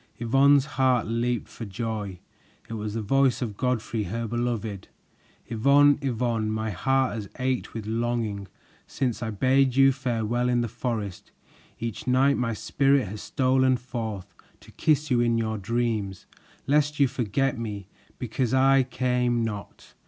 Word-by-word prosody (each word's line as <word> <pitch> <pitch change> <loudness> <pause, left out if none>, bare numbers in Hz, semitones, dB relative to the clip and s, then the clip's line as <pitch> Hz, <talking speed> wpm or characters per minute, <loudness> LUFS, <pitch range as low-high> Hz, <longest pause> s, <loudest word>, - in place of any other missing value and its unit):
Yvonne's 135 +4 +4
heart 130 -5 +1
leaped 115 +1 -1
for - - -9
joy; 105 -2 -4 0.5
it - - -7
was 105 -1 -4
the 115 - -2
voice 135 +4 +2
of 115 -5 -4
Godfrey, 115 -3 -1
her 115 +6 -3
beloved! 115 -4 -3 0.6
"Yvonne, 140 +5 +4
Yvonne, 120 -4 -1
my 110 0 -2
heart 135 +7 +1
has 105 -4 -6
ached 130 -2 -2
with 110 -2 -5
longing 110 -3 -2 0.4
Since 125 -4 -2
I 110 - -2
bade 130 +4 +2
you 135 0 +6
farewell 120 -2 -1
in 120 -1 +2
the 120 - -1
forest. 110 -6 -4 0.5
Each 115 +1 -5
night 135 +2 +4
my 115 -2 -1
spirit 135 -2 +1
has 105 +1 -7
stolen 130 0 +2
forth 115 -5 -6 0.3
To - - -16
kiss 150 -2 +1
you 125 - +4
in 120 -1 +2
your 110 -1 -1
dreams 110 -3 -2 0.4
Lest 150 +1 +1
you 140 - +5
forget 125 +2 -1
me, 105 -4 -5 0.3
because 125 +1 -1
I 135 +1 +5
came 125 -2 0
not. 105 -3 -7
120 Hz, 150 wpm, -26 LUFS, 110-130 Hz, 0.6 s, you